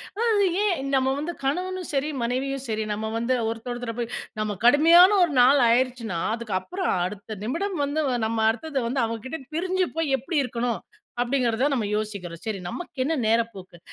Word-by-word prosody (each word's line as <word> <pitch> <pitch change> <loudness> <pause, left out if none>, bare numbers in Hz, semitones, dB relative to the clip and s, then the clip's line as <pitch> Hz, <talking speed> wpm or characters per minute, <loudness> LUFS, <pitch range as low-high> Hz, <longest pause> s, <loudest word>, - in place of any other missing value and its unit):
அதாவது 435 -3 +2 0.2
ஏன் 275 -9 0
நம்ம 265 0 +2
வந்து 340 +4 -3
கணவனும் 365 +6 -2
சரி, 285 +3 0
மனைவியும் 265 +2 -2
சரி, 215 0 -1
நம்ம 220 +1 -3
வந்து 245 +3 +1
ஒருத்தர் 230 +2 -5
ஒருத்தர 240 -1 -5
போய் 235 - -3 0.3
நம்ம 210 -1 -2
கடுமையான 330 +8 +8 0.2
1 310 - -5
நாள் 270 +2 +6
ஆயிருச்சுனா, 235 -7 0 0.2
அதுக்கப்பறம் 235 - -2
அடுத்த 205 +2 -7
நிமிடம் 355 - -2
வந்து 300 +2 -1 0.3
நம்ம 225 0 -2
அடுத்தது 270 +5 -2
வந்து 260 0 0
அவங்க 225 -1 -4
கிட்ட 320 - -4 0.2
பிரிஞ்சு 370 +2 +1
போய் 295 -5 +2
எப்படி 305 +5 -3
இருக்கணும், 240 -1 -2 0.4
அப்படிங்கிறத 245 -1 +1
நம்ம 230 -5 0
யோசிக்கிறோம், 200 -6 -4
சரி 210 -3 -3
நமக்கு 295 - -5
என்ன 315 +4 0
நேரப்போக்கு? 220 -6 -1
255 Hz, 165 wpm, -25 LUFS, 225-315 Hz, 0.4 s, கடுமையான